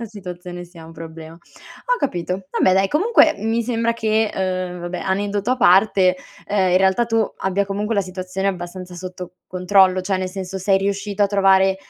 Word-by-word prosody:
la - - -4
situazione 180 -4 -8
sia 170 -2 -14
un 165 - -12
problema. 160 0 -10
Ho - - -6
capito. 185 - -3
Vabbè 185 - +3
dai, 195 +1 +3
comunque 405 - +4
mi 225 +3 0
sembra 230 0 0
che, 220 -1 0
uhm, 185 -1 -2
vabbè, 175 +1 -5
aneddoto 200 +3 -1
a 255 - +2
parte, 190 -3 +4 0.3
ehm, 195 -3 +1
in - - +5
realtà 190 +5 +3
tu 225 -1 +2 0.2
abbia 195 +1 0
comunque 205 +3 -2
la 200 - +2
situazione 185 +1 -3
abbastanza 180 0 -6
sotto 180 0 -8
controllo 185 0 +3
cioè, 190 +1 -1
nel 185 0 -2
senso: 190 0 -6
sei 195 +1 +2
riuscito 200 +1 -2
a - - +5
trovare 195 -1 +3
190 Hz, 180 wpm, -20 LUFS, 180-205 Hz, 0.3 s, in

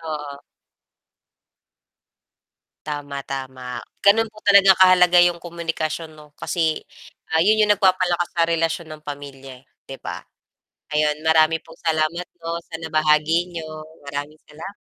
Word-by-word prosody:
Oo. 150 -3 -7 2.4
Tama, 145 -2 -5
tama, 130 -2 -6 0.2
ganun 225 +3 +5
po 215 0 -16
talaga 200 -1 +6
kahalaga 180 -1 +6
yung 175 -1 +2
komunikasyon 165 -2 -5
'no, 150 -1 -16
kasi 160 -3 -1 0.5
,ah, 160 - +2
yun 215 +5 +4
yung 210 - +2
nagpapalakas 185 -3 +2
sa 170 - +2
relasyon 165 0 -1
ng - - -28
pamilya, 135 -2 -9
eh, - - -33 0.2
'di 135 - -10
ba? - - -5 0.8
Ayon 150 0 +1
marami 160 0 +4
pong 165 0 -16
salamat 160 +2 0
po 165 0 -4
sa 165 - -7
nabahagi 160 +2 +1
niyo. 155 -1 -7 0.2
Maraming 145 +2 -5
salam 165 +7 -10
160 Hz, 130 wpm, -22 LUFS, 150-175 Hz, 2.4 s, talaga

